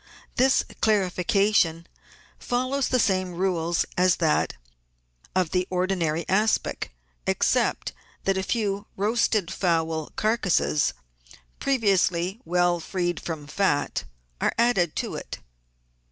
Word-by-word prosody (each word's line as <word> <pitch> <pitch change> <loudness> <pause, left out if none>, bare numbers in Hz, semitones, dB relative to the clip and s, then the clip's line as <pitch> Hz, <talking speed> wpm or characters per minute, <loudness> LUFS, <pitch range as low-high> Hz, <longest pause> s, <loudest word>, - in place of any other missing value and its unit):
This 260 +2 +3 0.2
clarification 190 -3 +2 0.5
follows 255 +2 0
the 255 - +2
same 185 -4 +1
rules 175 -2 0
as 180 0 +4
that 160 - +1 0.8
of 185 -4 +1
the 180 0 0
ordinary 180 -3 0
aspic, 210 +3 +1 0.4
except - - +1 0.3
that 195 - +1
a 190 - 0
few 205 -1 -2
roasted 215 -2 +1
fowl 160 -3 0
car 220 +2 +1
cases, 75 - +1 0.7
previously 195 -5 +1
well 175 0 +2
freed 175 0 -2
from 160 -3 -5
fat, 145 -2 0 0.4
are - - +1
added 230 -9 +2
to - - -3
it. - - -6
185 Hz, 110 wpm, -25 LUFS, 170-210 Hz, 0.8 s, as